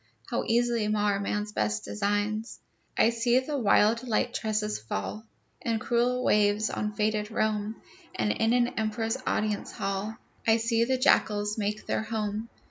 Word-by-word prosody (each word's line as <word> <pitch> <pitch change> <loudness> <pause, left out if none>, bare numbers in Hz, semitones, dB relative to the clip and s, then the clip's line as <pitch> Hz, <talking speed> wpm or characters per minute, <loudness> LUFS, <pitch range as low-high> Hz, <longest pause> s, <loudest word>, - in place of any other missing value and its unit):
How - - 0
easily 235 -1 +2
mar 205 -1 +1
man's 210 +1 -2
best 105 - -1
designs! 205 - -1 0.4
I 230 - +5
see 235 +1 +2
the 265 +3 -1
wild 230 -2 +4
Light 225 - +1
Tresses 215 -1 -1
fall 110 - -5 0.3
In 230 -1 0
cruel 245 +2 +1
waves 210 +1 +3
on 210 0 -2
fated 210 0 0
Rome, 215 -1 -1 0.4
And 105 -1 +1
in 225 - +1
an 245 -1 +3
emperor's 225 +2 -1
audience 210 -1 -1
hall 195 +3 -3 0.3
I 225 0 +6
see 230 0 +2
the 260 +1 +1
jackals 210 -5 +2
make 210 +1 -2
their - - 0
home. 220 0 -3
215 Hz, 150 wpm, -28 LUFS, 210-230 Hz, 0.4 s, I